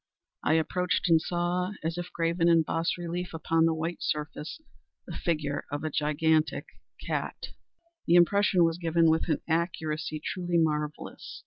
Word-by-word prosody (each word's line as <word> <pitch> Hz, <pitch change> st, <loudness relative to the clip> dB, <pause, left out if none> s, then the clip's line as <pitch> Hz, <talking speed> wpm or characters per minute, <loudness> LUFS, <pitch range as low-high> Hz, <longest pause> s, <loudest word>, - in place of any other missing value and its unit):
I -, -, +3 dB
approached 180 Hz, +4 st, 0 dB
and 165 Hz, -1 st, +5 dB
saw, 180 Hz, +3 st, -1 dB
as 165 Hz, +1 st, -1 dB
if 175 Hz, 0 st, -5 dB
graven 165 Hz, 0 st, +1 dB
in 165 Hz, -1 st, +5 dB
bas 165 Hz, +3 st, -1 dB
relief 175 Hz, 0 st, -4 dB
upon 165 Hz, 0 st, +2 dB
the 165 Hz, -, +3 dB
white 165 Hz, +2 st, -3 dB
surface, 150 Hz, -, -3 dB, 0.5 s
the -, -, -7 dB
figure 150 Hz, -5 st, -2 dB
of 145 Hz, +1 st, -3 dB
a 155 Hz, -, -2 dB
gigantic 155 Hz, +2 st, +1 dB, 0.4 s
cat. -, -, -3 dB, 0.6 s
The 170 Hz, -, +5 dB
impression 185 Hz, +1 st, +5 dB
was 165 Hz, +1 st, +1 dB
given 165 Hz, -1 st, +3 dB
with 160 Hz, +1 st, 0 dB
an -, -, +1 dB
accuracy 160 Hz, -2 st, -1 dB
truly 175 Hz, +2 st, -2 dB
marvellous. 150 Hz, -2 st, -2 dB
165 Hz, 150 wpm, -28 LUFS, 155-175 Hz, 0.6 s, and